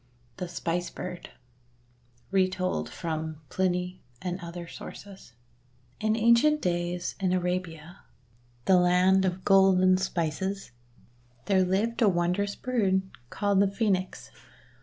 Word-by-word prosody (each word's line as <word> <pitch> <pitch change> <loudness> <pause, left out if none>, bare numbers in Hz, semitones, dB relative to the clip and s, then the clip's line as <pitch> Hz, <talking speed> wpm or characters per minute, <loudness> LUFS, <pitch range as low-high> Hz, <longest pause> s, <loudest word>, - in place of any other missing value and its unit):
THE 180 - -4
SPICE 175 0 -2
BIRD 180 0 -7 1.0
Retold 185 -1 0
from 160 -2 -4
Pliny 180 -1 -1 0.2
and 180 0 -4
Other 170 -1 -7
Sources 195 -6 -11 0.7
IN 215 0 +1
ancient 235 +7 +4
days, 175 -2 -2
in 190 -2 +1
Arabia, 180 -1 -3 0.7
the 190 - +5
land 180 +2 +4
of 185 0 -2
gold 195 -1 +5
and 185 0 +4
spices, 190 0 -2 0.7
there 190 -2 +3
lived 205 +6 0
a 215 - +6
wondrous 180 +3 0
bird 200 -7 +1 0.3
called 200 +3 +1
the 200 - +5
Phoenix. 195 -3 -1
185 Hz, 115 wpm, -28 LUFS, 175-195 Hz, 1.0 s, a